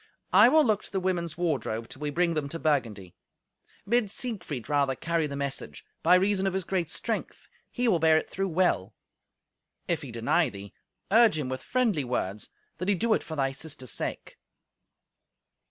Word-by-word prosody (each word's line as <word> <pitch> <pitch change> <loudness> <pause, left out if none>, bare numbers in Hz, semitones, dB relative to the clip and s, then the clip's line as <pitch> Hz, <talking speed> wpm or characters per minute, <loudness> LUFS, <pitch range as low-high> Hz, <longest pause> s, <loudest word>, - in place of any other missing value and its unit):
I - - +8
will 310 +2 +5
look 215 -3 +2
to - - -12
the 195 - 0
women's 170 -4 -2
wardrobe, 130 -10 -1
till - - -11
we 150 0 -2
bring 170 +3 +1
them 150 -3 -2
to 165 - -5
Burgundy. 115 - -1 0.7
Bid 235 -1 +2
Siegfried 195 - -5
rather 140 -2 +1
carry 165 +2 -1
the 140 - -6
message; 135 - -4 0.2
by 175 +3 +6
reason 195 +1 +2
of 190 - -1
his 190 - -1
great 180 -2 -1
strength - - -4 0.2
he 245 -1 -1
will 185 -7 +3
bear 160 0 +5
it - - -1
through 195 0 -2
well. 175 - +1 0.9
If - - 0
he - - -8
deny - - +1
thee, 100 0 -10 0.4
urge 225 -6 +6
him 140 -4 -2
with 130 0 -4
friendly 230 - +1
words, 105 -5 -3 0.3
that 180 - -3
he 205 - +4
do 225 +4 +2
it - - +1
for 160 - -7
thy 135 -2 0
sister's 135 -4 -6
sake." 95 - -5
160 Hz, 185 wpm, -28 LUFS, 135-190 Hz, 0.9 s, I